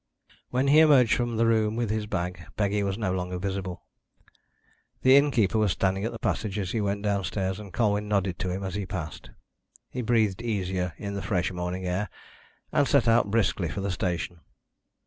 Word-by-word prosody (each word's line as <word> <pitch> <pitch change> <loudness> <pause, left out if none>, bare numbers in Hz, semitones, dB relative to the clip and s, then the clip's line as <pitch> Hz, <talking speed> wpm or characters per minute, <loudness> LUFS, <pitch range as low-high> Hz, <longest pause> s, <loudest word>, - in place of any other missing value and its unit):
When 130 +2 +1
he 150 +2 +7
emerged 140 -7 +6
from 120 -2 0
the 115 - +3
room 110 -1 +2
with 115 -2 -1
his 110 -1 -2
bag, 90 -2 -3
Peggy 105 0 +1
was 100 -1 -1
no 105 -5 -1
longer 90 0 -3
visible. 95 -1 -4 1.2
The 130 +1 +7
innkeeper 120 -8 +3
was 105 -5 +2
standing 95 0 0
in 115 - -2
the 115 - -6
passage 110 -2 -2
as 95 -3 -2
he 115 - 0
went 100 0 -1
downstairs, 100 -1 -1
and 100 -3 -9
Colwyn 105 +1 +1
nodded 100 -3 0
to 95 - -2
him 95 +2 -3
as 95 -2 -4
he 100 -1 -3
passed. 85 -5 -6 0.6
He 125 - -3
breathed 110 -3 +1
easier 95 -6 -2
in 100 -1 -5
the 100 - -3
fresh 90 0 0
morning 90 +1 -4
air, 90 +3 -1 0.6
and 140 - +3
set 140 -5 +3
out 115 -2 +4
briskly 100 -5 +1
for 100 - -4
the 100 0 -1
station. 90 -2 -2
100 Hz, 190 wpm, -27 LUFS, 95-110 Hz, 1.2 s, he